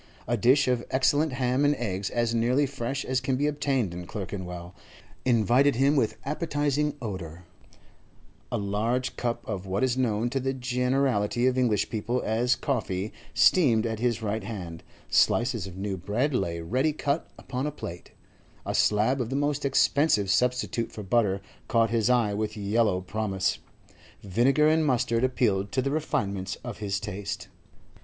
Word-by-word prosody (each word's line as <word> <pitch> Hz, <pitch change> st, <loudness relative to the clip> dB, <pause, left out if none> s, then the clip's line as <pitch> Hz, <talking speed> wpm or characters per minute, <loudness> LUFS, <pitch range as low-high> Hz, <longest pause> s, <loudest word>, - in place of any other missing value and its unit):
A 120 Hz, -, +1 dB
dish 130 Hz, +6 st, +4 dB
of 125 Hz, -2 st, +1 dB
excellent 145 Hz, +3 st, +2 dB
ham, 130 Hz, +1 st, +1 dB
and 145 Hz, 0 st, +3 dB
eggs 100 Hz, -6 st, -3 dB
as 120 Hz, -1 st, 0 dB
nearly 125 Hz, +5 st, +2 dB
fresh 135 Hz, 0 st, -3 dB
as 130 Hz, -1 st, 0 dB
can 130 Hz, 0 st, 0 dB
be 140 Hz, +3 st, 0 dB
obtained 140 Hz, -9 st, 0 dB
in 90 Hz, 0 st, -7 dB
Clerkenwell, 90 Hz, -3 st, -6 dB, 0.5 s
invited 125 Hz, +3 st, +4 dB
him 135 Hz, +4 st, +3 dB
with 110 Hz, -6 st, +1 dB
appetising 150 Hz, -1 st, 0 dB
odour; 90 Hz, -5 st, -6 dB, 1.1 s
a -, -, 0 dB
large 110 Hz, +6 st, -1 dB
cup 120 Hz, -1 st, -3 dB
of 100 Hz, -3 st, -4 dB
what 95 Hz, +4 st, -1 dB
is 130 Hz, -1 st, +1 dB
known 115 Hz, -2 st, +1 dB
to 135 Hz, -, 0 dB
the 135 Hz, +1 st, -1 dB
generality 125 Hz, -3 st, +1 dB
of 130 Hz, -1 st, +3 dB
English 120 Hz, -5 st, +1 dB
people 120 Hz, +2 st, -1 dB
as 120 Hz, +3 st, +2 dB
coffee 105 Hz, -7 st, -2 dB, 0.2 s
steamed 120 Hz, -11 st, +4 dB
at 110 Hz, -1 st, -2 dB
his 120 Hz, -1 st, 0 dB
right 110 Hz, 0 st, -2 dB
hand; 90 Hz, -6 st, -6 dB, 0.3 s
slices 115 Hz, -5 st, +2 dB
of 90 Hz, -1 st, -10 dB
new 95 Hz, 0 st, -3 dB
bread 115 Hz, -, -1 dB
lay 85 Hz, -8 st, -1 dB
ready 130 Hz, -, 0 dB
cut 145 Hz, +1 st, -2 dB
upon 130 Hz, +2 st, -4 dB
a -, -, -2 dB
plate; 85 Hz, -, -8 dB, 0.6 s
a -, -, -2 dB
slab 110 Hz, +6 st, +2 dB
of 115 Hz, -, -3 dB
the 135 Hz, -, -2 dB
most 145 Hz, 0 st, 0 dB
expensive 135 Hz, -6 st, +3 dB
substitute 125 Hz, +1 st, 0 dB
for 105 Hz, -, -7 dB
butter 100 Hz, -1 st, +1 dB, 0.3 s
caught 115 Hz, -1 st, +2 dB
his 115 Hz, 0 st, +2 dB
eye 120 Hz, -5 st, +3 dB
with 110 Hz, +1 st, -3 dB
yellow 105 Hz, -2 st, +1 dB
promise; 95 Hz, -1 st, -1 dB, 0.6 s
vinegar 125 Hz, +10 st, +3 dB
and 160 Hz, +1 st, +3 dB
mustard 125 Hz, -4 st, +1 dB
appealed 105 Hz, -6 st, +1 dB
to -, -, 0 dB
the 135 Hz, +2 st, 0 dB
refinements 100 Hz, -, -2 dB
of 120 Hz, -3 st, -6 dB
his 100 Hz, -2 st, -2 dB
taste. 100 Hz, 0 st, -5 dB
120 Hz, 165 wpm, -27 LUFS, 105-135 Hz, 1.1 s, dish